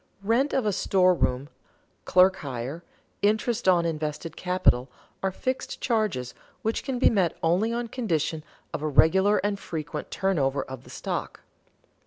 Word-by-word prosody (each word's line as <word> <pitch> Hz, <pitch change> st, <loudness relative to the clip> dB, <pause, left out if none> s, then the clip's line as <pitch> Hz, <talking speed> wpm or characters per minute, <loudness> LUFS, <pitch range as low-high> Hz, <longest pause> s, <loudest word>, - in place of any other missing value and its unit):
Rent 235 Hz, +7 st, +2 dB
of 265 Hz, -4 st, 0 dB
store 185 Hz, -1 st, +3 dB
room, 130 Hz, -5 st, 0 dB, 0.6 s
clerk 185 Hz, +1 st, +5 dB
hire, 135 Hz, +4 st, -5 dB, 0.4 s
interest 220 Hz, +2 st, +1 dB
on 175 Hz, -2 st, +5 dB
invested 155 Hz, 0 st, -3 dB
capital 180 Hz, -9 st, +2 dB, 0.3 s
are 195 Hz, -, +1 dB
fixed 255 Hz, +7 st, -3 dB
charges, 210 Hz, -, -1 dB, 0.3 s
which 220 Hz, +1 st, -1 dB
can 265 Hz, -3 st, -2 dB
be 245 Hz, -, +4 dB
met 190 Hz, -6 st, +1 dB
only 180 Hz, +8 st, +2 dB
on 235 Hz, 0 st, -2 dB
condition 165 Hz, -, -2 dB, 0.3 s
of -, -, -3 dB
a 155 Hz, -, -1 dB
regular 190 Hz, +8 st, +4 dB
and 205 Hz, -1 st, -1 dB
frequent 160 Hz, -4 st, -5 dB
turnover 140 Hz, -8 st, 0 dB
of 130 Hz, -1 st, -9 dB
the -, -, -14 dB
stock. -, -, -4 dB
180 Hz, 145 wpm, -26 LUFS, 150-215 Hz, 0.6 s, clerk